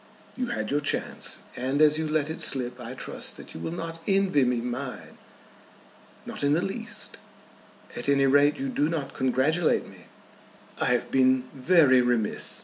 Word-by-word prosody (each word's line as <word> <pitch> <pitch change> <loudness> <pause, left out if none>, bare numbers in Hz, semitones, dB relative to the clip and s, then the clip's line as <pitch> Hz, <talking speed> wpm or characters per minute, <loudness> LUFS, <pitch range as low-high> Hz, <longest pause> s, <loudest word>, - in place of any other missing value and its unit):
You 255 -1 -2
had 240 - -3
your 145 - +2
chance, 145 - -2 0.2
and 130 +3 -1
as 155 0 +5
you 160 - -1
let 155 0 0
it 160 - -6
slip 125 -2 -2
I 125 +1 -7
trust - - -4
that - - -12
you - - -8
will 120 - -4
not 165 -1 -6
envy 195 -7 +3
me 125 -1 +1
mine." 125 +2 -6 1.1
"Not - - -6
in 145 0 +3
the 165 - +2
least." 225 +4 -5 0.8
"At - - -3
any 140 -1 +4
rate 145 +2 +4
you 275 - -3
do 155 - +1
not 155 -5 -3
congratulate 135 +6 +1
me." - - -15 0.7
"I - - +3
have 125 -1 +1
been 130 -1 +4
very 135 -2 +5
remiss. 120 -4 -1
145 Hz, 170 wpm, -26 LUFS, 130-165 Hz, 1.1 s, as